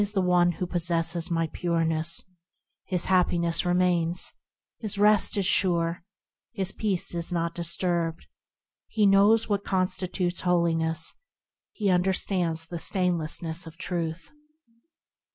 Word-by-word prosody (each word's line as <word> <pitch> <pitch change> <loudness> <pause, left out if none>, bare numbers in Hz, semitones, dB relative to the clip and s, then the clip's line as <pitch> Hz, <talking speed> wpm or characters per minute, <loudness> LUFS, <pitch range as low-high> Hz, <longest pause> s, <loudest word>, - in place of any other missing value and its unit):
he - - +3
it 205 - -6
is 180 -2 +2
who 180 - -2
possesses 170 0 +1
my 165 -1 0
Pureness; 165 -1 -1 0.6
His 180 -2 0
happiness 175 -2 +1
remains; 175 -1 +1 0.5
His 210 -3 -6
rest 210 0 +3
is 195 - 0
sure; 170 -3 +1 0.5
His 190 -1 -2
peace 200 -6 -1
is 170 +1 -3
not 170 -1 -2
disturbed; 170 -1 -1 0.6
He 215 -2 +1
knows 200 +3 +4
what 200 -1 -1
constitutes 185 -1 -2
holiness; 165 -2 +1 0.6
He 205 -3 -1
understands 180 -2 0
the 170 0 -7
stainlessness 170 -2 0
of 160 +1 -12
Truth. 175 - -5
175 Hz, 115 wpm, -26 LUFS, 165-185 Hz, 0.6 s, knows